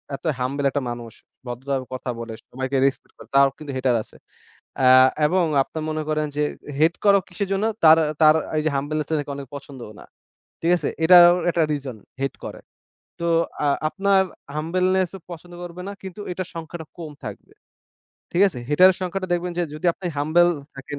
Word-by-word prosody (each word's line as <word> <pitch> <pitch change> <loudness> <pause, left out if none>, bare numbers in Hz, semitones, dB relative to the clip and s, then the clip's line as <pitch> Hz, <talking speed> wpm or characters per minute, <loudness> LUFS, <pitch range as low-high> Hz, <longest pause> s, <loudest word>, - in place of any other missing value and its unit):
এতো 150 - -6
হাম্বেল 140 +3 -2
একটা 145 - -1
মানুষ, 120 -1 -6 0.4
ভদ্রভাবে 130 +2 -3
কথা 130 0 -5
বলে, 115 -1 -6 0.2
সবাইকে 130 +2 -2
রেসপেক্ট 135 - -2
করে। - - -13
তারও 140 0 +6
কিন্তু 150 -3 -7
হেটার 130 -1 +1
আছে। - - -21 0.7
আ - - +3 0.4
এবং 180 +3 +2 0.2
আপনারা 160 +3 -7
মনে 155 0 -2
করেন 155 0 0
যে 150 - +1 0.3
এ - - -7
হেট 160 +2 +4
করো 200 -1 +6
কিসের 195 +2 -4
জন্য? 195 +2 0 0.2
তার, 160 0 +8 0.2
তার, 155 -1 +7 0.2
এইযে 155 +1 0
হাম্বলনেস 150 +2 -2
টা 160 - -1
নাকি 145 -1 -5
অনেকে 140 -2 -9
পছন্দও 135 -5 -10
না। - - -13 0.6
ঠিক 165 - +2
আছে? 155 -5 -2 0.2
এটাও 175 0 +8 0.2
একটা 170 -1 +1
রিজন 135 -5 -4 0.3
হেট 135 - -1
করে। - - -7 0.6
তো 170 - -3 0.4
আ - - +3 0.2
আপনার 195 +2 +2 0.3
হাম্বলনেস 185 +4 +1
ও - - -16
পছন্দ 175 +1 -10
করবে 175 +1 -8
না। - - -4
কিন্তু 190 +1 -8
এটার 185 0 -4
সংখ্যাটা 165 0 -7
কম 160 -3 -7
থাকবে। 105 -2 -9 0.8
ঠিক 175 - +3
আছে? 145 - -8
হেটারের 180 +5 +6
সংখ্যাটা 185 +1 -3
দেখবেন 175 0 -1
যে - - +2
যদি 155 +3 -4
আপনি 180 +1 -8
হাম্বল 160 +4 +4 0.3
থাকেন, 140 +1 -7
155 Hz, 185 wpm, -23 LUFS, 140-175 Hz, 0.8 s, তার